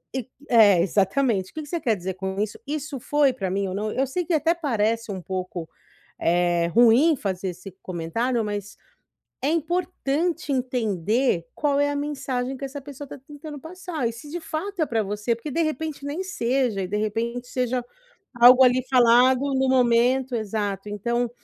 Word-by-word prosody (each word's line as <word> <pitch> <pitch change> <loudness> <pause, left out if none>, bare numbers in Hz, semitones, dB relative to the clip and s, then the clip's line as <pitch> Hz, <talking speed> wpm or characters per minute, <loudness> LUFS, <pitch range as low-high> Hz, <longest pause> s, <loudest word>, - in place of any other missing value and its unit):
E 260 -4 -3 0.2
é 210 -7 +6
exatamente. 195 +2 +1
"O - - -41
que 315 - -5
que 295 - -10
você 340 - -2
quer 230 -8 +1
dizer 185 -1 -5
com 190 +1 -4
isso? 210 0 -3
Isso 290 -1 -4
foi 290 +2 +2
pra 195 -7 -3
mim 195 +1 -1
ou 185 - -4
não?" 215 +2 -2
Eu 270 +4 0
sei 350 +7 -2
que 345 - -1
até 320 +2 +3
parece 230 -8 -1
um 190 -2 -5
pouco, 180 -2 -5 0.5
eh, 175 0 +2
ruim 240 - +5
fazer 190 -5 -3
esse 180 +2 -9
comentário 220 +8 -1
mas, 205 -1 -5 0.7
é 275 - +1
importante 330 -1 -1
entender 230 -6 0
qual 285 -1 +1
é 285 0 +2
a 290 - -2
mensagem 270 -3 -3
que 275 - -6
essa 280 +1 -7
pessoa 285 +1 -9
tá - - -9
tentando 295 0 -9
passar 330 -4 -5
e - - -5
se, 240 +6 -11
de 345 - -4
fato, 340 +3 -3
é - - +2
pra 225 -4 0
você, 210 +3 -1
porque, 235 +7 -7
de 330 +5 0
repente, 310 -1 -3
nem 300 +6 -3
seja 250 - 0
e, - - -2
de 205 - -2
repente, 235 +3 -2
seja 250 -1 -1 0.6
algo 250 +2 +9
ali 255 0 +4
falado 250 +1 +5
no 265 0 +2
momento 250 +1 +3
exato, 205 -2 -3
então, 235 +4 -1
245 Hz, 185 wpm, -24 LUFS, 205-285 Hz, 0.7 s, algo